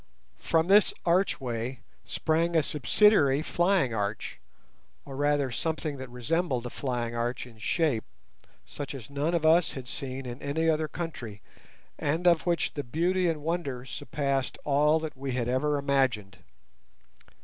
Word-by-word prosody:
From 165 Hz, 0 st, +1 dB
this 205 Hz, +2 st, +5 dB
archway 130 Hz, -, 0 dB, 0.2 s
sprang 165 Hz, +2 st, 0 dB
a 160 Hz, -, +4 dB
subsidiary 150 Hz, -, +4 dB
flying 175 Hz, -7 st, +2 dB
arch, 105 Hz, -1 st, -3 dB, 0.7 s
or 135 Hz, -, -8 dB
rather 145 Hz, -1 st, +1 dB
something 155 Hz, +2 st, -2 dB
that 130 Hz, -1 st, -7 dB
resembled 125 Hz, +2 st, -1 dB
a 120 Hz, -, -5 dB
flying 120 Hz, -3 st, -3 dB
arch 120 Hz, +2 st, -2 dB
in 115 Hz, -3 st, -15 dB
shape, 145 Hz, -3 st, +1 dB, 0.6 s
such 140 Hz, -, -6 dB
as 135 Hz, 0 st, -9 dB
none 145 Hz, +5 st, 0 dB
of 160 Hz, -2 st, 0 dB
us 165 Hz, +2 st, +4 dB
had 130 Hz, -2 st, -7 dB
seen 135 Hz, 0 st, -5 dB
in 120 Hz, +1 st, -7 dB
any 155 Hz, +3 st, -1 dB
other 155 Hz, -1 st, +2 dB
country, 140 Hz, -, -6 dB, 0.6 s
and 160 Hz, +3 st, -1 dB
of 170 Hz, -1 st, +4 dB
which 170 Hz, -1 st, +1 dB
the 145 Hz, -, -3 dB
beauty 175 Hz, +7 st, +1 dB
and 155 Hz, -3 st, -3 dB
wonder 150 Hz, -7 st, -2 dB
surpassed 140 Hz, -1 st, -2 dB
all 150 Hz, +2 st, +3 dB
that 160 Hz, -2 st, -5 dB
we 135 Hz, -1 st, -4 dB
had 120 Hz, -2 st, -1 dB
ever 145 Hz, +4 st, +1 dB
imagined. 130 Hz, -9 st, 0 dB
140 Hz, 150 wpm, -28 LUFS, 125-160 Hz, 0.7 s, this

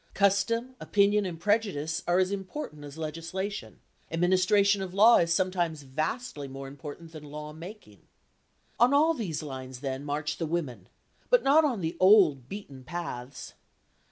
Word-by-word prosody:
Custom, 200 Hz, +6 st, +1 dB
opinion 205 Hz, 0 st, +2 dB
and 165 Hz, -3 st, -6 dB
prejudice 200 Hz, -6 st, 0 dB
are 175 Hz, +1 st, +3 dB
as 185 Hz, +1 st, +2 dB
important 190 Hz, -, -6 dB
as 145 Hz, +1 st, -10 dB
legislation; 165 Hz, +6 st, -5 dB, 0.3 s
administration 185 Hz, +4 st, +3 dB
of 190 Hz, -1 st, -6 dB
law 220 Hz, +4 st, +7 dB
is 170 Hz, 0 st, +2 dB
sometimes 170 Hz, -4 st, 0 dB
vastly 150 Hz, -, -3 dB
more 135 Hz, 0 st, -8 dB
important 145 Hz, +4 st, -9 dB
than 155 Hz, -2 st, -10 dB
law 150 Hz, +1 st, -8 dB
making. 165 Hz, -, -11 dB, 0.8 s
On 250 Hz, +4 st, +5 dB
all 315 Hz, +3 st, +4 dB
these 185 Hz, -, -4 dB
lines, 130 Hz, -3 st, -7 dB
then, 135 Hz, -1 st, -4 dB
march 150 Hz, +1 st, -3 dB
the 165 Hz, -, -2 dB
women, 155 Hz, -7 st, -4 dB, 0.4 s
but -, -, +4 dB
not 295 Hz, +4 st, +5 dB
on 250 Hz, -9 st, 0 dB
the 160 Hz, -1 st, -3 dB
old 180 Hz, -, +5 dB
beaten 140 Hz, -10 st, -8 dB
paths. 140 Hz, -4 st, -6 dB
170 Hz, 150 wpm, -28 LUFS, 145-200 Hz, 0.8 s, law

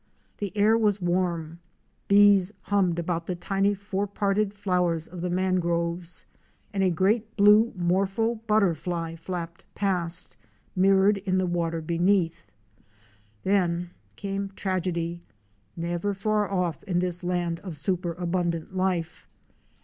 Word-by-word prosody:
The 205 Hz, -3 st, -3 dB
air 210 Hz, +2 st, +5 dB
was 210 Hz, -2 st, +2 dB
warm, 175 Hz, -2 st, -1 dB, 0.5 s
bees 200 Hz, -1 st, +6 dB
hummed 190 Hz, -4 st, +1 dB
about 170 Hz, 0 st, -2 dB
the 180 Hz, -, -2 dB
tiny 195 Hz, +3 st, 0 dB
four 200 Hz, 0 st, -3 dB
parted 200 Hz, 0 st, 0 dB
flowers 180 Hz, -5 st, 0 dB
of 180 Hz, -1 st, -8 dB
the 180 Hz, -, -2 dB
mangroves, 175 Hz, -1 st, 0 dB, 0.5 s
and 195 Hz, -, 0 dB
a 190 Hz, -, +4 dB
great 210 Hz, +6 st, 0 dB
blue 210 Hz, +3 st, +6 dB
morpho 195 Hz, +6 st, 0 dB
butterfly 175 Hz, -5 st, +1 dB
flapped 170 Hz, 0 st, -6 dB
past, 180 Hz, -4 st, 0 dB, 0.4 s
mirrored 195 Hz, +2 st, +4 dB
in 190 Hz, -1 st, -1 dB
the 185 Hz, -, +2 dB
water 170 Hz, -2 st, -1 dB
beneath. 170 Hz, +1 st, +1 dB, 1.0 s
Then 175 Hz, -3 st, +1 dB, 0.2 s
came 195 Hz, 0 st, -3 dB
tragedy 175 Hz, -3 st, -2 dB, 0.3 s
— 100 Hz, 0 st, -40 dB
never 175 Hz, +4 st, -1 dB
far 210 Hz, 0 st, 0 dB
off 180 Hz, -6 st, -1 dB
in 180 Hz, -4 st, -1 dB
this 180 Hz, 0 st, -1 dB
land 175 Hz, -2 st, -1 dB
of 175 Hz, -4 st, -7 dB
superabundant 175 Hz, +1 st, -2 dB
life. 180 Hz, -3 st, -1 dB
180 Hz, 125 wpm, -26 LUFS, 170-200 Hz, 1.0 s, bees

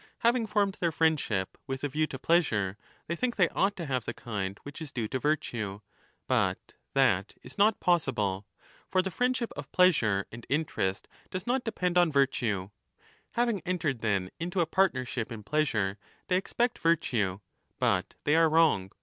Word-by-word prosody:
Having 235 Hz, -1 st, +3 dB
formed 200 Hz, -2 st, +1 dB
their 170 Hz, -2 st, +1 dB
friendship 150 Hz, -, 0 dB
with 135 Hz, 0 st, -4 dB
a -, -, +2 dB
view 155 Hz, +3 st, 0 dB
to 135 Hz, -, -6 dB
pleasure, 115 Hz, -, +2 dB, 0.3 s
they 170 Hz, -, -2 dB
think 245 Hz, +6 st, -1 dB
they 185 Hz, -4 st, +4 dB
ought 200 Hz, +1 st, +1 dB
to 175 Hz, -3 st, -5 dB
have 130 Hz, -5 st, -1 dB
the -, -, -4 dB
kind 100 Hz, -4 st, -4 dB
which 145 Hz, +3 st, -9 dB
is 155 Hz, -3 st, -6 dB
due 115 Hz, -3 st, -2 dB
to 130 Hz, -, -2 dB
virtue; 115 Hz, -9 st, -1 dB, 0.5 s
but -, -, 0 dB, 0.2 s
that -, -, +2 dB
is -, -, -10 dB
not 210 Hz, +1 st, +4 dB
possible. 110 Hz, -, +1 dB, 0.4 s
|^r 185 Hz, -1 st, +3 dB
the 190 Hz, -, -3 dB
friendship 250 Hz, +3 st, 0 dB
of -, -, -8 dB
pleasure 115 Hz, -, +3 dB
and 120 Hz, -, -8 dB
30 -, -, -1 dB
interest 100 Hz, -11 st, -2 dB, 0.2 s
does 185 Hz, +1 st, -5 dB
not 245 Hz, +1 st, 0 dB
depend 180 Hz, -5 st, +1 dB
on 175 Hz, -2 st, +4 dB
virtue. 115 Hz, -9 st, +1 dB, 0.6 s
Having 235 Hz, -5 st, +1 dB
entered 165 Hz, -8 st, -1 dB
then 100 Hz, -4 st, 0 dB
into 175 Hz, +2 st, -2 dB
a 170 Hz, -, +4 dB
partnership 130 Hz, -, 0 dB
in 110 Hz, -2 st, -7 dB
pleasure, 110 Hz, -7 st, 0 dB, 0.3 s
they 180 Hz, -, +3 dB
expect 235 Hz, +6 st, 0 dB
virtue, 115 Hz, -, +1 dB, 0.4 s
but -, -, +1 dB
there -, -, -25 dB
they 150 Hz, -, +3 dB
are 165 Hz, -1 st, +5 dB
wrong. 155 Hz, -, +3 dB
155 Hz, 175 wpm, -29 LUFS, 110-180 Hz, 0.6 s, are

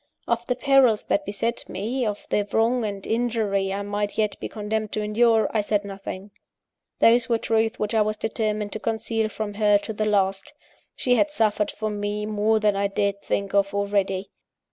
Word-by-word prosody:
Of 235 Hz, 0 st, -1 dB
the 250 Hz, -, +1 dB
perils 260 Hz, -5 st, +4 dB
that 300 Hz, -, +1 dB
beset 230 Hz, +3 st, -3 dB
me, 230 Hz, +6 st, -2 dB
of 205 Hz, -1 st, -4 dB
the 205 Hz, -1 st, +1 dB
wrong 235 Hz, +2 st, +2 dB
and 200 Hz, -2 st, -4 dB
injury 220 Hz, -4 st, 0 dB
I 200 Hz, +1 st, -2 dB
might 205 Hz, 0 st, -3 dB
yet 215 Hz, -2 st, +1 dB
be -, -, -5 dB
condemned 215 Hz, 0 st, -3 dB
to 215 Hz, -, -1 dB
endure, 220 Hz, +1 st, +3 dB
I 215 Hz, -, +2 dB
said 205 Hz, 0 st, 0 dB
nothing. 195 Hz, 0 st, -7 dB, 0.7 s
Those 235 Hz, +1 st, +4 dB
were 230 Hz, -, +3 dB
truths 225 Hz, 0 st, 0 dB
which 210 Hz, +1 st, -2 dB
I 220 Hz, -, +4 dB
was 215 Hz, 0 st, 0 dB
determined 215 Hz, -1 st, -2 dB
to 220 Hz, -, -4 dB
conceal 225 Hz, 0 st, -1 dB
from 215 Hz, -1 st, -4 dB
her, 210 Hz, 0 st, +4 dB
to 210 Hz, +2 st, -6 dB
the 215 Hz, 0 st, -1 dB
last. 195 Hz, +1 st, 0 dB, 0.4 s
She 250 Hz, -1 st, +2 dB
had 305 Hz, -, +3 dB
suffered 215 Hz, -6 st, +1 dB
for 215 Hz, 0 st, -3 dB
me 205 Hz, 0 st, -3 dB
more 215 Hz, +1 st, +1 dB
than 210 Hz, -1 st, +2 dB
I 200 Hz, 0 st, +1 dB
dared 200 Hz, 0 st, -1 dB
think 200 Hz, -1 st, -2 dB
of, 200 Hz, 0 st, +2 dB
already! 200 Hz, -1 st, -1 dB
210 Hz, 190 wpm, -24 LUFS, 205-225 Hz, 0.7 s, perils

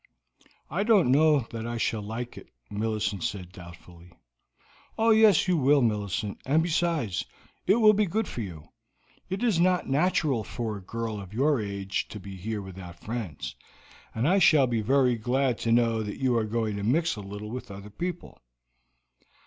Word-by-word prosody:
"I 175 Hz, +7 st, -2 dB
don't 205 Hz, -, +4 dB
know 150 Hz, +1 st, +5 dB
that 115 Hz, -1 st, -5 dB
I 120 Hz, 0 st, -3 dB
shall 110 Hz, -1 st, -1 dB
like 115 Hz, +4 st, -6 dB
it," -, -, -12 dB, 0.2 s
Millicent 105 Hz, -3 st, -2 dB
said 90 Hz, -3 st, -4 dB
doubtfully. 85 Hz, -1 st, -13 dB, 0.9 s
"Oh, 225 Hz, +1 st, +4 dB
yes, 215 Hz, -5 st, +5 dB
you 180 Hz, -2 st, +3 dB
will, 140 Hz, -1 st, +4 dB
Millicent; 105 Hz, -1 st, -1 dB
and 155 Hz, +5 st, +2 dB
besides, 165 Hz, -, 0 dB, 0.4 s
it 195 Hz, -, +5 dB
will 215 Hz, -2 st, +6 dB
be 210 Hz, 0 st, +2 dB
good 215 Hz, +4 st, -1 dB
for 120 Hz, -, -5 dB
you. 85 Hz, -8 st, -8 dB, 0.6 s
It 190 Hz, +5 st, -3 dB
is 220 Hz, -8 st, +2 dB
not 180 Hz, +1 st, +2 dB
natural 145 Hz, -4 st, +1 dB
for 110 Hz, 0 st, -4 dB
a 100 Hz, -, -8 dB
girl 110 Hz, +1 st, -4 dB
of 100 Hz, +2 st, -11 dB
your 140 Hz, 0 st, +2 dB
age 100 Hz, -1 st, -3 dB
to 105 Hz, -, -8 dB
be 100 Hz, 0 st, -9 dB
here 105 Hz, +2 st, -4 dB
without 90 Hz, -2 st, -10 dB
friends, 110 Hz, -, -5 dB, 0.6 s
and 115 Hz, +5 st, +1 dB
I 190 Hz, +4 st, +4 dB
shall 155 Hz, -6 st, +6 dB
be 120 Hz, -3 st, -1 dB
very 125 Hz, +1 st, +3 dB
glad 125 Hz, +2 st, 0 dB
to 115 Hz, -, -1 dB
know 115 Hz, -1 st, +3 dB
that 105 Hz, -1 st, -5 dB
you 130 Hz, -2 st, +1 dB
are 115 Hz, -2 st, +1 dB
going 110 Hz, -1 st, -2 dB
to 100 Hz, -, -4 dB
mix 160 Hz, +10 st, +1 dB
a 105 Hz, -, -7 dB
little 105 Hz, +2 st, -7 dB
with 125 Hz, -1 st, -6 dB
other 100 Hz, +1 st, -9 dB
people." 175 Hz, -, -5 dB
115 Hz, 180 wpm, -27 LUFS, 105-155 Hz, 0.9 s, will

